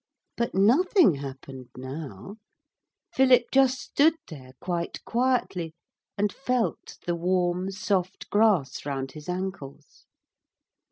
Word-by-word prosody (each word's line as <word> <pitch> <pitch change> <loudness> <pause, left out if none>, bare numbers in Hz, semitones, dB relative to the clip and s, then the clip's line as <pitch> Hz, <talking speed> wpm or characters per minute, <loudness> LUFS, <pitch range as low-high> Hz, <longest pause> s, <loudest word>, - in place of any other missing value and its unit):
But 235 -4 -2
nothing 265 - +5
happened 135 -2 -8
now 135 - -7 0.8
Philip 255 -3 +5
just 265 -1 +4
stood 310 +3 +3
there 130 -5 -11
quite 175 -2 -4
quietly 230 -10 0 0.4
and 205 0 0
felt 250 -3 -2
the 175 - 0
warm 180 +1 0
soft 190 -1 -2
grass 205 -11 +2
round 135 -2 -3
his 150 +4 -10
ankles. 180 -6 -6
185 Hz, 105 wpm, -26 LUFS, 145-235 Hz, 0.8 s, nothing